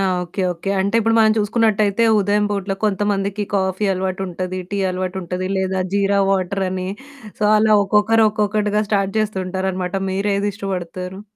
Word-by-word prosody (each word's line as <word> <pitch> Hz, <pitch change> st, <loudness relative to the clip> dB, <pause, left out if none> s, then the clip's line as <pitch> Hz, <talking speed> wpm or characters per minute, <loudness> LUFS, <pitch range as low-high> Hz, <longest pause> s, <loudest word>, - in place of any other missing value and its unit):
ఆ! -, -, +1 dB, 0.2 s
Okay. 180 Hz, +2 st, -4 dB
Okay. 175 Hz, +3 st, -5 dB
అంటే 200 Hz, +3 st, -1 dB
ఇప్పుడు 225 Hz, +1 st, +2 dB
మనం 220 Hz, -1 st, +5 dB
చూసుకున్నట్టయితే 215 Hz, 0 st, +2 dB, 0.2 s
ఉదయం 205 Hz, +1 st, +1 dB
పూటలో 200 Hz, -1 st, -2 dB
కొంతమందికి 205 Hz, 0 st, 0 dB
కాఫీ 190 Hz, +1 st, 0 dB
అలవాటు 190 Hz, 0 st, -2 dB
ఉంటది. 185 Hz, +1 st, -4 dB
టీ 200 Hz, -, -2 dB
అలవాటు 185 Hz, 0 st, -3 dB
ఉంటది, 180 Hz, +2 st, -4 dB
లేదా 190 Hz, 0 st, -1 dB
జీరా 200 Hz, 0 st, +2 dB
వాటర్ 195 Hz, 0 st, 0 dB
అని 185 Hz, 0 st, -3 dB, 0.5 s
సో -, -, +1 dB
అలా 215 Hz, 0 st, +4 dB
ఒక్కొక్కరు 210 Hz, +3 st, +3 dB
ఒక్కొక్కటిగా 210 Hz, 0 st, 0 dB
స్టార్ట్ 195 Hz, -2 st, 0 dB
చేస్తూ 215 Hz, -2 st, -2 dB
ఉంటారన్నమాట 185 Hz, 0 st, -2 dB
మీరేది 200 Hz, +1 st, 0 dB
ఇష్టపడతారు? 185 Hz, -1 st, -5 dB
195 Hz, 155 wpm, -20 LUFS, 185-210 Hz, 0.5 s, మనం